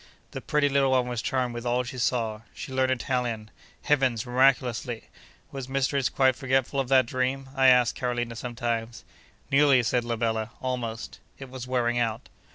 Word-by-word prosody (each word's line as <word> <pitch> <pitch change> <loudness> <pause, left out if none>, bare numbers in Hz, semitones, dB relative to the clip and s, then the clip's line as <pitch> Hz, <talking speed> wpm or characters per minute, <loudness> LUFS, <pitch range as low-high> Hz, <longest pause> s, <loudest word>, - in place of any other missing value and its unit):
The - - -6
pretty 150 -1 +1
little 140 -1 +2
one 130 -1 +2
was 120 -2 -3
charmed 125 -2 -1
with 120 0 -6
all 125 +1 +1
she 125 +1 -7
saw. 115 -3 -1
She 135 - -7
learnt 130 0 +2
Italian—heavens! 125 0 -1
miraculously! 125 -2 +1 0.4
Was 135 -2 -6
mistress 135 -1 +1
quite 130 -2 +3
forgetful 135 0 0
of 135 - 0
that 130 -2 +5
dream? 130 +2 -2
I 135 -1 +4
asked 125 -2 +5
Carolina 120 -2 -3
sometimes. 115 -1 -4 0.5
Nearly, 135 -2 +5
said 120 +1 +1
la 120 0 -2
bella—almost. 115 +1 -3 0.2
It 135 -2 -10
was 130 -1 -7
wearing 120 -1 +1
out. 115 0 -2
125 Hz, 160 wpm, -26 LUFS, 120-130 Hz, 0.5 s, that